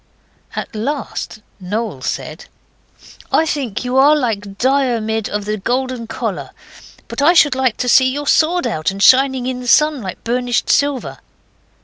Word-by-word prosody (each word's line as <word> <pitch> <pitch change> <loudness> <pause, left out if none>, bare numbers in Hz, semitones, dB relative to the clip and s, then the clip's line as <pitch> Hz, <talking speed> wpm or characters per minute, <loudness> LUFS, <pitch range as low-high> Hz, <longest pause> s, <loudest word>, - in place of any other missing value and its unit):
At - - -5
last 230 -2 -4 0.2
Noel 200 - -4
said - - -5 0.9
'I 320 - +3
think 270 -7 -3
you 250 +1 -1
are 285 +3 +6
like 205 -8 -3
Diarmid 235 -5 0
of 210 0 -3
the 215 +1 -2
Golden 250 +2 -2
Collar. 225 - -4 0.6
But - - -4
I 315 +5 +5
should 295 -5 +5
like 255 -3 0
to 250 - -2
see 260 +1 +5
your 290 +2 -4
sword 340 +5 +2
out, 155 0 -1
and 195 +1 -3
shining 260 0 +4
in 255 -1 -3
the 250 - -8
sun 300 +1 +3
like 190 -3 -7
burnished 245 +1 0
silver. 285 -3 0
250 Hz, 155 wpm, -17 LUFS, 220-275 Hz, 0.9 s, are